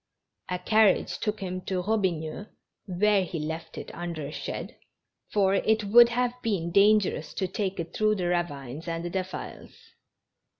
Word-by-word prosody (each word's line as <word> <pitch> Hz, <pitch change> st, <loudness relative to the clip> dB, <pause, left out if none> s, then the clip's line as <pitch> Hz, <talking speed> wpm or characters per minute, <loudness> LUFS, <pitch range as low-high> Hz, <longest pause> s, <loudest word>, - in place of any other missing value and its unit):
A 180 Hz, -, -1 dB
carriage 210 Hz, +2 st, +3 dB
took 210 Hz, -1 st, -2 dB
him 185 Hz, -1 st, -4 dB
to 185 Hz, -2 st, -1 dB
Eobigneux, 190 Hz, -3 st, -1 dB, 0.4 s
where 200 Hz, +2 st, +3 dB
he 175 Hz, -1 st, -5 dB
left 160 Hz, +1 st, -5 dB
it -, -, -7 dB
under 170 Hz, -3 st, -5 dB
a 140 Hz, -, -6 dB
shed, -, -, -6 dB, 0.6 s
for 195 Hz, -2 st, +3 dB
it 220 Hz, +2 st, +2 dB
would 235 Hz, +4 st, +7 dB
have 245 Hz, 0 st, 0 dB
been 185 Hz, -7 st, -1 dB
dangerous 200 Hz, -5 st, +3 dB
to 190 Hz, -, -1 dB
take 190 Hz, 0 st, -3 dB
it 165 Hz, 0 st, -5 dB
through 215 Hz, 0 st, +2 dB
the 185 Hz, -3 st, -2 dB
ravines 160 Hz, -4 st, -2 dB
and 170 Hz, +1 st, -3 dB
defiles. 190 Hz, -1 st, -5 dB
185 Hz, 155 wpm, -27 LUFS, 170-210 Hz, 0.6 s, would